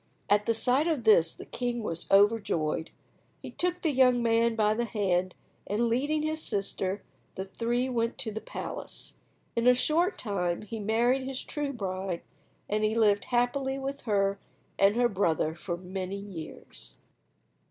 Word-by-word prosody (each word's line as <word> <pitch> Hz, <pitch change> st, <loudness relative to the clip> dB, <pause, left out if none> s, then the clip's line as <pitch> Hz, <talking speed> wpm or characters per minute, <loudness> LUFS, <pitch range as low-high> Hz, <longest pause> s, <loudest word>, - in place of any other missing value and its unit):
At 205 Hz, 0 st, +4 dB
the 230 Hz, -, +3 dB
sight 255 Hz, +7 st, +3 dB
of 310 Hz, -8 st, 0 dB
this 170 Hz, -7 st, +5 dB
the -, -, -10 dB
king 240 Hz, -1 st, -3 dB
was 170 Hz, -5 st, -3 dB
overjoyed. 200 Hz, -7 st, +3 dB, 0.5 s
He -, -, -7 dB
took 360 Hz, 0 st, -1 dB
the 320 Hz, -, +2 dB
young 250 Hz, -3 st, +4 dB
man 230 Hz, 0 st, +3 dB
by 215 Hz, -1 st, +3 dB
the 235 Hz, +2 st, -1 dB
hand, 185 Hz, -5 st, 0 dB, 0.3 s
and, 220 Hz, +4 st, +1 dB
leading 290 Hz, +6 st, +1 dB
his 310 Hz, 0 st, 0 dB
sister, 195 Hz, -3 st, -1 dB, 0.3 s
the 190 Hz, -, -4 dB
three 240 Hz, +5 st, -1 dB
went 230 Hz, -2 st, -1 dB
to 245 Hz, -5 st, -3 dB
the 220 Hz, +1 st, -5 dB
palace. -, -, -5 dB, 0.4 s
In 235 Hz, +1 st, +2 dB
a 250 Hz, -, +7 dB
short 335 Hz, +9 st, +2 dB
time 180 Hz, -5 st, -1 dB
he 220 Hz, +2 st, -6 dB
married 240 Hz, +5 st, +1 dB
his 265 Hz, -1 st, -4 dB
true 295 Hz, -2 st, -3 dB
bride, 190 Hz, -6 st, -4 dB, 0.4 s
and 215 Hz, +1 st, 0 dB
he 215 Hz, +1 st, +1 dB
lived 210 Hz, -3 st, +3 dB
happily 265 Hz, +2 st, 0 dB
with 275 Hz, +1 st, -4 dB
her 200 Hz, -1 st, +2 dB, 0.4 s
and 200 Hz, +2 st, +5 dB
her 240 Hz, 0 st, +4 dB
brother 170 Hz, -7 st, +1 dB
for 175 Hz, +1 st, -5 dB
many 185 Hz, +2 st, -5 dB
years. 195 Hz, -6 st, -8 dB
225 Hz, 165 wpm, -29 LUFS, 195-250 Hz, 0.5 s, a